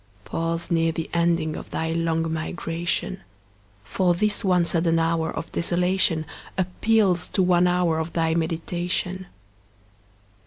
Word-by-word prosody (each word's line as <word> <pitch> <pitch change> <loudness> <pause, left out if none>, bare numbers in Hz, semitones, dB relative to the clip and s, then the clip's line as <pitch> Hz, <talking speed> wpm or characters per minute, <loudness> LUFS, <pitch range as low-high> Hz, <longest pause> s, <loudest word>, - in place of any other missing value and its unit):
Pause 165 +1 -2
near 165 -1 +2
the 160 0 -5
ending 170 -2 +1
of - - -8
thy 160 0 -2
long 165 -1 0
migration; 165 +3 -3 0.6
For 175 - +1
this 210 +3 +1
one 180 -3 +3
sudden 165 0 +2
hour 165 0 +1
of 165 - -5
desolation 175 -2 +1 0.3
Appeals 185 0 +2
to 190 - +3
one 180 0 +4
hour 175 -2 +2
of 160 +1 -4
thy 165 -1 +1
meditation. 175 +2 -2
170 Hz, 125 wpm, -24 LUFS, 165-180 Hz, 0.6 s, one